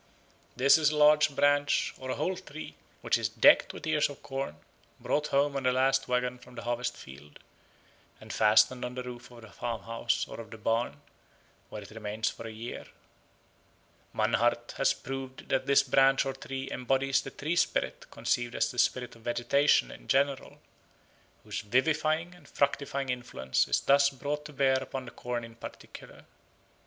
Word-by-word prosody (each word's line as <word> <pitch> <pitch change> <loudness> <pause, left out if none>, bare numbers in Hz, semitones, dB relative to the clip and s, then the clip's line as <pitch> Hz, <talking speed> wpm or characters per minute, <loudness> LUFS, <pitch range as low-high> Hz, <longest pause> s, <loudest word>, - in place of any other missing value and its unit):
This 135 +5 +5
is 150 -2 +4
a 150 - -2
large 150 0 +5
branch 145 0 +2
or 130 - -7
a - - -1
whole 180 +6 -1
tree, 155 -3 -9 0.3
which - - +1
is - - -1
decked - - +5
with - - -9
ears 155 -2 +2
of 145 - -11
corn, 135 - -4 0.4
brought 150 0 0
home 140 0 +1
on 135 - -1
the 130 -1 +2
last 135 +1 +2
waggon 125 0 -1
from 125 0 -16
the 115 - -7
harvest 120 0 -2
field, 70 +3 -13 0.8
and - - -9
fastened 110 +4 +4
on 125 0 -5
the 125 - -4
roof 120 -1 -9
of 120 -1 -14
the 110 - -13
farmhouse 115 0 -2
or - - -9
of 115 -1 -9
the 110 - -9
barn, 115 +2 -1 0.7
where 105 - -7
it 100 - -13
remains 110 0 -3
for 115 - -9
a - - -7
year. 115 +2 -7 1.3
Mannhardt - - +1
has - - +3
proved 135 -1 -7
that 135 - 0
this 140 0 +5
branch 135 0 +4
or 135 - -2
tree 135 0 -6
embodies 135 +2 +1
the - - -7
tree 155 +5 -3
spirit 170 - 0
conceived 120 -1 -1
as - - +1
the 125 - -5
spirit 125 -1 +1
of 115 - -17
vegetation 120 - +2
in - - -13
general, 140 0 0 0.8
whose - - -4
vivifying 155 +8 +1
and 170 -5 -18
fructifying 140 -1 -1
influence 120 - -1
is - - +2
thus 140 0 +5
brought 145 +2 -4
to 150 - -8
bear 135 -1 +3
upon 130 0 -6
the 120 - -9
corn 120 -1 -4
in 115 0 -10
particular. 115 - -11
130 Hz, 175 wpm, -29 LUFS, 120-140 Hz, 1.3 s, This